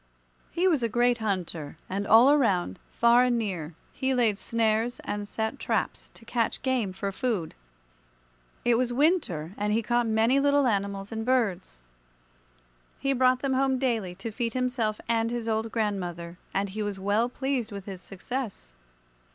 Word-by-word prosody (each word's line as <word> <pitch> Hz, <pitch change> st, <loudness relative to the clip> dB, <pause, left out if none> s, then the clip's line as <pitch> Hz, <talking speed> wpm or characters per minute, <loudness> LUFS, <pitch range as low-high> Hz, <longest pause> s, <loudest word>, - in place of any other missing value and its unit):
He 360 Hz, +2 st, +1 dB
was 315 Hz, -8 st, +3 dB
a 230 Hz, -, 0 dB
great 240 Hz, +1 st, +2 dB
hunter, 175 Hz, -8 st, -3 dB
and 200 Hz, +2 st, -3 dB
all 235 Hz, +6 st, +7 dB
around, 195 Hz, -, +2 dB
far 235 Hz, +1 st, +4 dB
and 245 Hz, -1 st, +2 dB
near, 175 Hz, -8 st, -3 dB, 0.2 s
he 265 Hz, 0 st, 0 dB
laid 220 Hz, -5 st, +2 dB
snares 230 Hz, +1 st, 0 dB
and 205 Hz, 0 st, -4 dB
set 220 Hz, +5 st, -3 dB
traps -, -, -2 dB
to 230 Hz, -, -14 dB
catch 230 Hz, -1 st, -1 dB
game 255 Hz, -7 st, 0 dB
for 195 Hz, +1 st, -4 dB
food. 205 Hz, -7 st, -2 dB, 1.1 s
It 240 Hz, -1 st, +4 dB
was 250 Hz, -1 st, 0 dB
winter, 240 Hz, -, +1 dB
and 210 Hz, 0 st, 0 dB
he 225 Hz, +2 st, +1 dB
caught 240 Hz, +1 st, +1 dB
many 225 Hz, +5 st, +3 dB
little 285 Hz, 0 st, +3 dB
animals 200 Hz, -2 st, -1 dB
and 225 Hz, 0 st, -3 dB
birds. 200 Hz, -, 0 dB, 1.1 s
He 275 Hz, 0 st, 0 dB
brought 255 Hz, 0 st, +3 dB
them 275 Hz, -1 st, 0 dB
home 265 Hz, 0 st, +2 dB
daily 225 Hz, -9 st, -1 dB
to 215 Hz, +5 st, -5 dB
feed 230 Hz, +1 st, -2 dB
himself 250 Hz, -4 st, 0 dB
and 230 Hz, -1 st, +1 dB
his 235 Hz, -1 st, -3 dB
old 220 Hz, 0 st, -1 dB
grandmother, 180 Hz, -6 st, -3 dB
and 200 Hz, +1 st, -1 dB
he 215 Hz, +3 st, -5 dB
was 205 Hz, -2 st, -3 dB
well 205 Hz, +5 st, +1 dB
pleased 265 Hz, -3 st, -2 dB
with 200 Hz, -1 st, -7 dB
his 190 Hz, -3 st, -7 dB
success. 195 Hz, -, -6 dB
225 Hz, 165 wpm, -27 LUFS, 200-250 Hz, 1.1 s, all